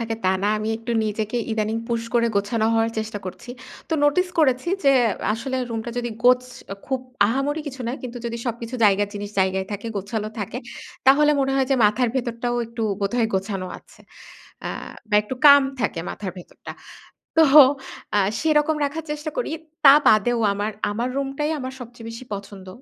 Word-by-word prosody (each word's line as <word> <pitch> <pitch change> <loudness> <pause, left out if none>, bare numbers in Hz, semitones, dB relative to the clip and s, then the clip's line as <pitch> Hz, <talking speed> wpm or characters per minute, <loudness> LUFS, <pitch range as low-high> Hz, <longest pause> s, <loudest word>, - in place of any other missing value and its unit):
থাকে 225 -1 -2
তা - - +4
না। - - +2
আমি 215 +1 -3
একটু 230 +1 -5
নিজেকে 215 +2 -2
ইদানিং 220 0 -1
পুশ 230 -1 -1
করে 235 0 +4
গোছানো 215 +2 0
হওয়ার 225 0 +2
চেষ্টা 220 -1 -4
করছি। 185 +6 -8 0.4
তো - - -4
নোটিস 360 +6 +3
করেছি 260 -1 +2 0.2
যে 275 - +6 0.4
আসলে 260 +4 -3
রুমটা 225 +1 -4
যদি 240 0 -2 0.2
গোছ 250 0 +6 0.4
খুব 265 -1 -1 0.3
আহামরি 275 +7 -1
কিছু 265 -2 -7
না। - - -2
কিন্তু 250 -1 -6
যদি 235 0 -3
সবকিছু 235 +1 -4
জায়গার 205 0 +3
জিনিস 205 0 -5
জায়গায় 190 0 0
থাকে, 205 +3 -5
গোছালো 210 +2 -3
থাকে 210 +4 -4 0.5
তাহলে 295 +3 +6
মনে 270 0 +1
হয় 265 -1 +2
যে - - +5
মাথার 220 +4 +3
ভেতরটাও 240 -1 -2
একটু 230 0 -6 0.2
বোধহয় 225 +4 +1
গোছানো 190 -1 -2
আছে। - - -22 0.6
আ - - -2 0.4
বা - - +1
একটু 210 +5 -5
কাম 285 -1 +9 0.2
থাকে 200 -7 -1
মাথার 195 -3 -5
ভেতরটা। 175 - -11 0.7
তো 320 - +8 0.7
আ - - +4 0.2
সেরকম 310 0 +2
রাখার 310 +3 -4
চেষ্টা 300 +1 -4
করি। - - -1 0.3
তা 275 -1 +10
বাদেও 230 +3 +4
আমার 205 +2 -2 0.2
আমার 235 +4 -2
রুমটাই 275 +2 -2
আমার 260 0 -5
সবচেয়ে 240 -2 -10
বেশি 230 +3 -9
পছন্দ। 200 -1 -8
235 Hz, 175 wpm, -23 LUFS, 210-265 Hz, 0.7 s, তা